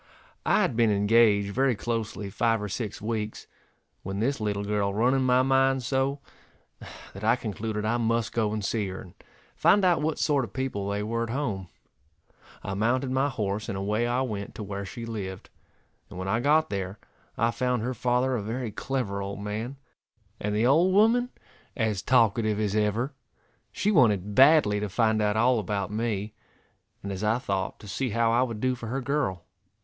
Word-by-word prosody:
I - - +4
had - - -1
been 115 -1 +3
engaged 105 0 +3
very 130 0 +2
closely 110 -3 -3
five 115 +2 +1
or 105 - -4
six 105 0 -5
weeks, 110 -1 -3 0.6
when 95 +1 -4
this 135 +3 0
little 100 -1 -1
girl 100 -1 0
run 115 +6 +2
in 135 - +2
my 130 0 +3
mind 135 0 +2
so, 135 +2 0 0.9
that 100 - -9
I 110 +2 +4
concluded 110 -2 -4
I 115 +2 +1
must 115 -1 0
go 110 -2 +1
and 105 -2 -3
see 105 -2 -1
her, 95 0 -6
and 90 - -12 0.4
find 205 -2 +4
out 175 -4 +3
what 155 +1 -1
sort 145 -3 +2
of - - -8
people 125 -7 -3
they 100 +1 -1
were 115 +2 -2
at 115 - -2
home. 115 -8 -2 1.0
I 95 - -4
mounted 125 +6 0
my 135 +2 +1
horse 105 -4 -3
and 95 - -3
away 105 +4 0
I 120 +2 0
went 105 -6 -4
to 110 - -6
where 100 0 -5
she 115 +4 -7
lived, 100 -5 -6 0.6
and - - -10
when 95 +1 -4
I 110 +4 +1
got 150 +3 +3
there 95 0 -3 0.4
I 115 +1 +2
found 125 -2 -1
her 125 +2 -2
father 125 +1 +1
a 115 - -2
very 115 +2 -4
clever 105 -3 -3
old 100 0 -5
man, 110 +6 -4 0.6
and 105 0 -2
the 110 +3 +2
old 170 +8 +4
woman 235 +4 +4 0.5
as 110 -5 0
talkative 110 -3 +2
as 105 -1 0
ever. 110 +6 0 0.6
She 210 - 0
wanted 105 - +3
badly 135 -5 +5
to 105 0 -3
find 110 +1 +2
out 105 0 +1
all 120 +1 +3
about 100 -1 -3
me, 105 -2 -2 0.7
and 100 - -4
as 95 +1 -5
I 110 +2 +2
thought 95 -6 -3
to 105 - -11
see 130 +6 -2
how 115 +1 +2
I 120 +2 +3
would 115 -4 -2
do 130 +2 +1
for 120 -2 -7
her 130 +4 -2
girl. 125 - -1
110 Hz, 190 wpm, -27 LUFS, 105-130 Hz, 1.0 s, badly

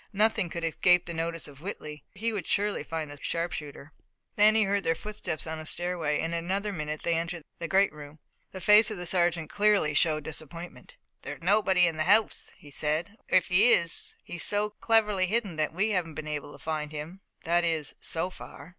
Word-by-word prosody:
Nothing 215 -2 +2
could 170 0 -5
escape 180 +2 +3
the 170 - -5
notice 165 0 -3
of 140 -1 -14
Whitley, 150 -6 -7
and - - -14
he 230 0 0
would 205 - -4
surely 205 +1 0
find 160 -2 -4
the 145 - -10
sharpshooter. 155 -3 -4 0.4
Then 215 +1 +6
he 220 - +5
heard 200 0 0
their 165 - +1
footsteps 210 -5 -4
on 160 0 -5
a 155 - -8
stairway 175 -4 -1
and 165 +1 -2
in 170 0 -2
another 200 +3 -1
minute 150 -3 -4
they 170 - +1
entered 165 0 -2 0.2
the 170 - -3
great 195 -1 +3
room. 150 0 -11 0.3
The 190 - -9
face 210 +2 +7
of 215 - -4
the 180 - -5
sergeant 170 -3 +1
clearly 205 -7 +3
showed 155 0 +2
disappointment. 165 - -7 0.3
"There's - - -8
nobody 190 -1 +4
in 165 -2 -1
the 155 - 0
house," 205 +4 +2
he 145 - -15
said, 155 +8 -1 0.2
"or, - - +7
if 180 - 0
he 195 +7 +6
is 170 0 0
he's 175 - -5
so 210 +1 0
cleverly 210 -4 +2
hidden, 205 -3 -1
that 155 -1 0
we 200 +6 0
haven't 170 -5 -1
been 155 0 -6
able 150 -1 -4
to - - -11
find 155 -1 -4
him 155 +5 -7 0.2
that 175 +1 +2
is 160 -3 -1
so 175 +3 -1
far. 145 -3 -11
170 Hz, 210 wpm, -28 LUFS, 155-200 Hz, 0.4 s, face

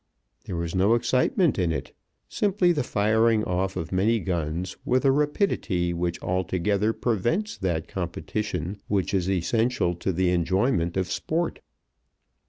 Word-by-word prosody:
There - - -5
was 85 -1 -3
no 100 +5 +4
excitement 125 - +2
in 90 -3 +1
it, - - -5 0.3
simply 195 -3 +2
the 150 -4 +1
firing 110 0 +2
off 95 +1 -1
of 80 - -4
many 105 +5 +2
guns 85 -1 -3
with 130 +2 +1
a 135 - +6
rapidity 135 - 0
which 85 0 -2
altogether 95 +4 0
prevents 120 - -1
that 85 -4 -1
competition 95 +1 -4
which 100 -1 0
is 95 -1 +1
essential 105 +1 +1
to 85 +3 -2
the 90 0 +1
enjoyment 90 +1 +1
of 90 -2 -1
sport. 165 +2 -1
95 Hz, 140 wpm, -25 LUFS, 90-120 Hz, 0.3 s, a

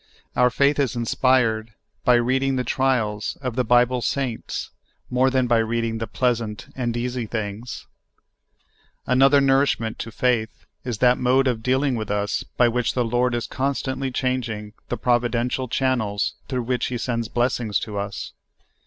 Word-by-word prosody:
Our 125 0 +4
faith 140 +3 +2
is 135 -5 +1
inspired 115 -2 +1 0.3
by 125 - +5
reading 130 +3 +1
the 125 - 0
trials 120 -5 0
of 125 -4 -4
the 125 - +1
Bible 125 +1 +3
saints 130 -2 -3 0.4
more 130 +1 +3
than 130 -1 +2
by 120 -1 +3
reading 115 0 -1
the 115 - -3
pleasant 115 -2 -1
and 120 -2 -2
easy 120 -1 -2
things. 110 +2 -5 1.2
Another 135 +3 +5
nourishment 135 -5 +2
to 115 - -5
faith 115 -1 -1 0.2
is 120 -4 -3
that 125 0 +4
mode 130 +2 +3
of 120 -3 0
deal 130 +4 +1
ing 140 -3 +1
wath 110 -1 -4
us 105 0 -1 0.2
by 120 - +5
which 120 0 0
the 125 -2 +1
Lord 120 +1 +1
is 120 - -2
constantly 135 0 -2
changing 120 -5 -2 0.2
the 120 - -2
providential 120 +2 0
channels 115 -6 0
through 130 -3 -2
which 125 +1 -1
He 125 - -3
sends 115 -1 -2
FEEDING 120 - -5
OUR - - +5
FAITH. - - -6
37 120 - -4
blessings 105 - +1
to 105 -2 -6
us. 100 0 -5
125 Hz, 170 wpm, -23 LUFS, 115-130 Hz, 1.2 s, by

